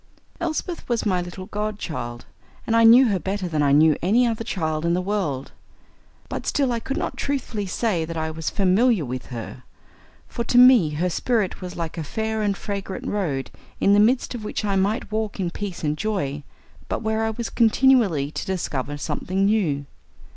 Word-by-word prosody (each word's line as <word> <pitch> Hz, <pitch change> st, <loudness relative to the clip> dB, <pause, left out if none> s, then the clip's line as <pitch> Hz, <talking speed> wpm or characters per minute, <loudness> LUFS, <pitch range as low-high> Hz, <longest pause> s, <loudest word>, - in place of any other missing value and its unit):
Elsbeth 340 Hz, -1 st, -3 dB
was 235 Hz, -2 st, 0 dB
my 185 Hz, -3 st, +1 dB
little 175 Hz, +2 st, -7 dB
godchild, 185 Hz, -, -4 dB, 0.4 s
and 230 Hz, -, +1 dB
I 230 Hz, -, +5 dB
knew 235 Hz, +2 st, +8 dB
her 195 Hz, -3 st, +1 dB
better 195 Hz, 0 st, -3 dB
than 155 Hz, -3 st, -1 dB
I 140 Hz, -1 st, +3 dB
knew 155 Hz, +1 st, +5 dB
any 225 Hz, +8 st, +3 dB
other 225 Hz, -1 st, -1 dB
child 160 Hz, -8 st, -2 dB
in 170 Hz, 0 st, +2 dB
the -, -, +1 dB
world. 180 Hz, -9 st, -2 dB, 0.8 s
But -, -, -5 dB
still 275 Hz, -3 st, +1 dB
I 235 Hz, -, -1 dB
could 270 Hz, +4 st, -4 dB
not -, -, -3 dB
truthfully 245 Hz, -7 st, -2 dB
say 185 Hz, -3 st, 0 dB
that 165 Hz, +1 st, -6 dB
I 160 Hz, 0 st, -2 dB
was 160 Hz, 0 st, -3 dB
familiar 200 Hz, -, +2 dB
with 125 Hz, 0 st, -5 dB
her, 120 Hz, 0 st, -7 dB, 0.7 s
for 235 Hz, -, -3 dB
to 245 Hz, -, +1 dB
me 250 Hz, -9 st, +7 dB
her 175 Hz, +4 st, 0 dB
spirit 210 Hz, +2 st, -1 dB
was 180 Hz, -1 st, -6 dB
like 165 Hz, 0 st, -4 dB
a -, -, -2 dB
fair 220 Hz, +7 st, -2 dB
and 200 Hz, -2 st, 0 dB
fragrant 195 Hz, -2 st, -5 dB
road 150 Hz, -11 st, -2 dB, 0.3 s
in 200 Hz, -, +4 dB
the 205 Hz, -, +5 dB
midst 245 Hz, +6 st, +3 dB
of 235 Hz, -3 st, -6 dB
which 210 Hz, -, -3 dB
I 200 Hz, -1 st, 0 dB
might 205 Hz, +5 st, 0 dB
walk 215 Hz, -1 st, -2 dB
in 175 Hz, -3 st, -1 dB
peace 195 Hz, -2 st, -6 dB
and 150 Hz, -1 st, 0 dB
joy, 155 Hz, -8 st, -2 dB, 0.5 s
but -, -, -2 dB
where 220 Hz, 0 st, 0 dB
I 220 Hz, -, +1 dB
was 230 Hz, +1 st, -4 dB
continually 225 Hz, -, +3 dB
to -, -, -5 dB
discover 145 Hz, -6 st, -3 dB
something 185 Hz, +6 st, -1 dB
new. 175 Hz, -10 st, +1 dB
195 Hz, 190 wpm, -23 LUFS, 160-225 Hz, 0.8 s, knew